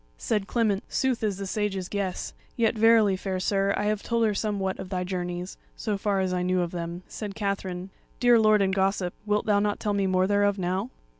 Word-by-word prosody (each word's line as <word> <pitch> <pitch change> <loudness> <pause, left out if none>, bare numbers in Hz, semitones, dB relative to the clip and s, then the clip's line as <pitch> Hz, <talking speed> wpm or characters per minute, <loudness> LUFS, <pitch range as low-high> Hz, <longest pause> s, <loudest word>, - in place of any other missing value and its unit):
Said 210 - -1
Clement: 215 -4 +1
"Sooth 260 -3 0
is 205 -3 0
the 200 - -4
Sage's 195 -2 -2
guess; 195 -3 -3 0.2
yet 230 -2 +3
verily, 220 -3 +5
fair 185 0 -3
sir, 195 +1 +1
I 205 - -1
have 210 0 0
told 230 -1 +1
her 215 - +2
somewhat 200 -2 -2
of 185 - -6
thy 185 -1 -1
journeys, 180 0 -4 0.2
so 215 -3 -2
far 200 -1 0
as 185 -1 0
I 180 - 0
knew 180 0 +1
of 170 -1 -2
them." 170 0 -5
Said 205 -3 -6
Katherine: 195 -3 -3 0.3
"Dear 245 -2 +6
lord 215 -2 +5
and 190 0 +1
gossip, 190 -2 +1
wilt 210 0 +1
thou 205 -2 +3
not 205 0 0
tell 210 -2 -1
me 200 -1 +1
more 185 0 +3
thereof 205 0 +2
now?" 185 +5 -1
200 Hz, 215 wpm, -26 LUFS, 185-210 Hz, 0.3 s, Dear